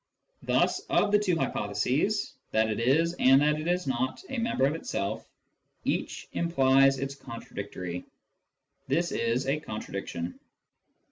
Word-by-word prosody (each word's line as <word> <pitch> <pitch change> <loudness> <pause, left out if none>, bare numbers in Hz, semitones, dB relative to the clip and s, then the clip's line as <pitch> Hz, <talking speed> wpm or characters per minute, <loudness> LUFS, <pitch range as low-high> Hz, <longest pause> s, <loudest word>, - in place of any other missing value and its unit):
Thus - - +2
of 205 - +3
the 210 - +5
two 185 -5 +1
hypo 130 -7 -1
theses 150 - +1
— - - -45
that 110 0 +3
it 105 - -2
is, 155 +8 +3
and 135 +1 +7
that 150 0 +2
it 155 - -4
is 180 +1 +1
not, 130 - -1
a 265 - -2
member 230 - +1
of 140 - +2
itself 100 -10 -3 0.3
— - - -47
each - - -2
implies 135 -5 +4
its 135 +1 -3
contradictory. 100 -8 -7 0.8
This 165 +6 +1
is 115 +2 0
a 140 +3 +1
contradiction. 95 - -5
135 Hz, 150 wpm, -28 LUFS, 115-165 Hz, 0.8 s, and